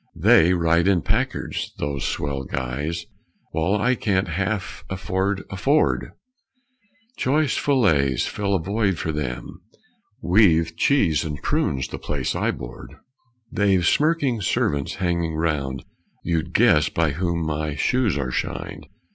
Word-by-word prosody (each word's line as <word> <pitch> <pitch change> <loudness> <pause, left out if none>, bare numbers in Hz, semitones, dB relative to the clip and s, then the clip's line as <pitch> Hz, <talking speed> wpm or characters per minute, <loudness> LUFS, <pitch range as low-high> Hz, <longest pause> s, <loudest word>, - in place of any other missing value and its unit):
They 85 +3 +5
ride 85 +1 +2
in 95 -4 +3
Packards, - - -2
those 70 -2 -3
swell 70 -2 -2
guys, 70 +7 -3 0.5
While 85 +6 0
I 125 +4 +2
can't 95 -6 0
half 95 +3 -3
afford 95 +1 -2
a - - -4
Ford; 140 +11 +1 1.0
Choice 145 +2 +1
fillets 80 - +2
fill 100 -1 -1
a - - +1
void 100 +1 0
for 80 - -2
them, 75 +3 -5 0.6
We've 85 -3 +3
cheese 85 - +2
and 75 -3 -5
prunes 65 -1 0
the - - -7
place - - -3
I - - 0
board; - - -7 0.6
They've 95 -4 +2
smirking 145 - +2
servants 70 -5 0
hanging 85 -4 -1
round, 70 -5 -2 0.4
You'd 85 -1 -1
guess 90 -9 +4
by 80 -3 +1
whom 85 +1 -1
my 75 -1 -2
shoes 115 - +1
are 65 -3 -2
shined. - - -4
85 Hz, 130 wpm, -23 LUFS, 75-100 Hz, 1.0 s, They